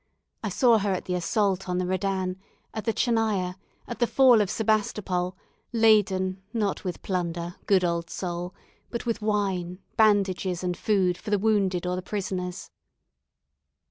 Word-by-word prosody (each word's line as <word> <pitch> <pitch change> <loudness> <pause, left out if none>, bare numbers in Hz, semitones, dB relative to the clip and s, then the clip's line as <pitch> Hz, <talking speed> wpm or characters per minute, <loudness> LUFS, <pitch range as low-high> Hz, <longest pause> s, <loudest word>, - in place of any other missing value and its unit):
I - - -1
saw 240 -5 +4
her 200 0 0
at 185 - -3
the 180 - -2
assault 190 +1 0
on 180 - 0
the 180 - 0
Redan, 185 0 -1 0.4
at 220 - -5
the 225 - +2
Tchernaya, 220 -6 +1 0.3
at 240 - -6
the 240 - +3
fall 250 -4 +6
of 200 - 0
Sebastopol, 200 -4 0 0.4
laden, 195 -4 +3
not 210 -4 -1
with 180 -3 -5
plunder, 175 -2 -3
good 190 -2 +4
old 170 -1 -1
soul! 175 0 -4 0.3
but 235 - -4
with 230 -1 -1
wine, 195 -4 -1 0.2
bandages, 195 -4 +2
and 180 -1 -1
food 185 -3 +1
for 210 - -7
the 205 - +3
wounded 195 -4 +1
or 180 0 0
the 185 - -3
prisoners." 185 -2 -4
190 Hz, 155 wpm, -26 LUFS, 180-215 Hz, 0.4 s, fall